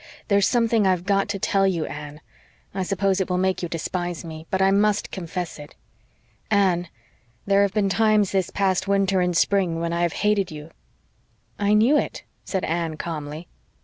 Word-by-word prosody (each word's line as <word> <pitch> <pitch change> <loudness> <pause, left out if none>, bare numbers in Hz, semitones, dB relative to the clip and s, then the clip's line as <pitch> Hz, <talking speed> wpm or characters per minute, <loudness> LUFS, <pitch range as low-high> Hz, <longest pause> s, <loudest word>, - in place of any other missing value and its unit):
There's 200 -1 +4
something 230 -4 +2
I've 180 -1 +1
GOT 195 0 +1
to 205 - -2
tell 195 0 +2
you, 170 -4 0
Anne. 150 0 -8 0.5
I 195 - -2
suppose 195 +1 0
it 190 - -2
will 180 - 0
make 190 0 0
you 175 - -3
despise 175 +1 -3
me, 160 0 -9
but 190 - -1
I 190 0 +4
MUST 205 +1 +1
confess 175 -2 -5
it. 145 0 -11 0.7
Anne, 185 -4 +2 0.6
there 200 0 +3
have 200 0 +1
been 205 -2 +2
times 210 +1 +2
this 190 -2 0
past 190 -1 0
winter 195 -1 +2
and 180 -1 +1
spring 180 -3 +2
when 170 0 -2
I 170 - -1
have 175 -2 +1
HATED 210 -3 +1
you." 155 +1 -9 0.9
"I 205 +1 +3
KNEW 240 +8 +5
it," - - -3 0.2
said 190 -2 -3
Anne 165 -1 -2
calmly. 155 0 -6
190 Hz, 180 wpm, -23 LUFS, 170-200 Hz, 0.9 s, KNEW